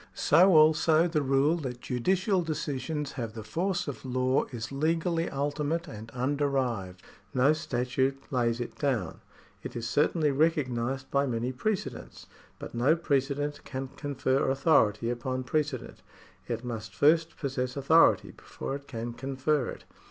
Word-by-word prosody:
So 185 +1 +5
also 155 +2 +5
the 160 -3 0
rule 140 +4 +2
that 130 -6 -5
judicial 185 - +1
decisions 150 -2 -3
have 115 -4 -5
the 110 - -6
force 175 - -1
of 145 - -6
law 130 +1 +1
is 115 -2 -7
legally 165 +4 0
ultimate 145 +4 -2
and 110 -6 -8
underived. 130 -6 -1 0.4
No 135 +4 +5
statute 130 -1 -1 0.2
lays 120 -2 +1
it 120 - -5
down. 125 - -1 0.4
It - - -8
is 120 -1 -3
certainly 150 +3 +2
recognised 135 -4 0
by 140 0 +2
many 120 0 -1
precedents, 200 +10 -4 0.3
but - - -8
no 125 +7 +3
pre 155 -5 +2
cedent 145 +2 -4
can 130 -1 -5
confer 135 -2 -1
authority 120 -6 +3
upon 130 +2 -3
precedent. 145 -1 -2 0.5
It 120 0 -4
must 115 -2 -5
jSrst 160 +2 +3
possess 130 -2 -3
authority 160 +4 +4
before - - -7
it 140 0 -18
can 120 -1 -5
confer 135 +2 -1
it. - - -8
135 Hz, 145 wpm, -28 LUFS, 125-155 Hz, 0.5 s, So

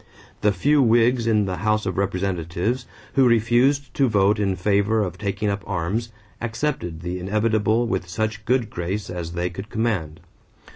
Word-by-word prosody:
The 105 - +4
few 140 +10 +3
Whigs 120 0 +3
in 105 -2 +3
the 95 -2 -3
House 110 0 0
of 95 - -2
Representatives, 95 +4 -1 0.3
who 135 -2 +5
refused 120 +5 +2
to 135 -3 +2
vote 105 0 +3
in 100 -2 +1
favor 100 +3 +2
of 90 - -4
taking 100 0 -2
up 100 0 -1
arms, 100 +5 -2 0.3
accepted 115 - -3
the 90 +1 -3
inevitable 110 +3 +1
with 95 -5 -2
such 110 +3 -2
good 125 -4 +1
grace 95 +4 -3
as 85 -2 -5
they 90 +1 -2
could 95 +4 -8
command. 100 -9 -2
105 Hz, 160 wpm, -23 LUFS, 95-115 Hz, 0.3 s, who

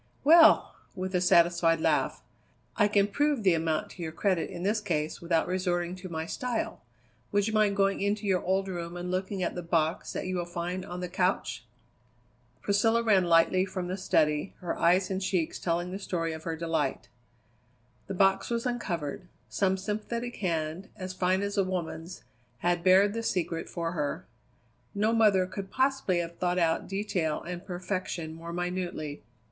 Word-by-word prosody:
"Well!" 325 +3 +7 0.2
with 185 0 -4
a 180 - +2
satisfied 170 -2 +4
laugh, - - +1 0.5
"I 210 - +4
can 205 -1 +3
prove 285 +3 +1
the 185 -3 +5
amount 160 -1 -1
to 180 - -10
your 160 -1 -3
credit 180 +1 0
in 175 -2 -6
this 210 +3 +1
case 155 -6 -2
without 170 -1 +1
resorting 180 -1 -1
to 185 0 -8
my 160 -1 -3
style. 245 +6 -3 0.5
Would 205 -1 +2
you 220 - -2
mind 210 -2 +3
going 195 0 +2
into 205 +1 0
your 190 -2 +2
old 190 +1 +1
room 175 -2 -5
and 180 0 -4
looking 190 +1 -2
at - - -1
the 180 - -4
box 165 -1 0
that - - -3
you 185 0 -2
will 175 - -2
find 175 +2 -4
on 180 -1 -6
the 180 - -3
couch?" 170 - -1 1.0
Priscilla 225 +3 +2
ran 200 -5 +4
lightly 170 +2 +4
from 185 -2 -4
the 185 - -1
study, 155 -3 +1
her 175 -3 -3
eyes 185 +3 +3
and 190 0 -1
cheeks 180 -4 -1
telling 175 +1 -1
the 190 - -4
story 165 -4 -2
of 160 0 -9
her 165 - -2
delight. 160 -4 -2 1.0
The 195 - -4
box 195 +1 +3
was 235 0 -1
uncovered. 180 - -3 0.2
Some 190 -1 +1
sympathetic 215 +5 -4
hand, 165 0 -2
as 185 -3 -6
fine 185 +1 +1
as 200 0 -1
a - - +4
woman's, 180 -1 -5 0.4
had 175 -1 +2
bared 195 +3 +5
the 230 - -2
secret 175 -6 -2
for 170 -1 -3
her. 150 -4 -3 0.7
No 215 +3 +2
mother 210 -5 +4
could 190 +1 -6
possibly 265 -8 +1
have 170 0 -4
thought 180 0 0
out 165 -2 +1
detail 190 -6 -1
and 175 +1 -6
perfection 180 -3 -4
more 165 +1 -8
minutely. 175 -4 -3
185 Hz, 175 wpm, -29 LUFS, 170-200 Hz, 1.0 s, Well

